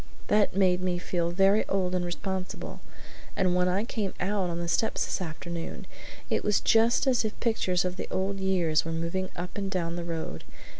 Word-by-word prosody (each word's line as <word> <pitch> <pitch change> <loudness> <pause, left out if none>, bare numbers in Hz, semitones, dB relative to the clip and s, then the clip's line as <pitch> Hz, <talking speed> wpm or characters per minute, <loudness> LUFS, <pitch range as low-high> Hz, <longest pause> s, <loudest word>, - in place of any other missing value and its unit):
That 210 -2 +3
made 185 -2 +3
me 180 -1 0
feel 175 -1 -1
very 195 +4 +4
old 185 -2 0
and 180 -1 +1
responsible; 185 +1 -4 0.5
and 185 -2 +2
when 180 0 +3
I 185 +3 +1
came 215 -4 -3
out 190 -1 0
on 170 - -3
the 170 - -2
steps 220 +6 +1
this - - -2
afternoon 170 0 -5 0.4
it - - 0
was 210 -1 +3
just 230 +4 +4
as 255 -3 +3
if 220 -1 -4
pictures 185 -6 +1
of 180 0 -2
the - - -4
old 195 +1 -1
years 180 -5 +2
were 165 - -4
moving 170 +3 -2
up 180 +3 -5
and 195 -1 -2
down 170 -3 -1
the 175 - -3
road. 165 - -4
185 Hz, 195 wpm, -28 LUFS, 175-195 Hz, 0.5 s, very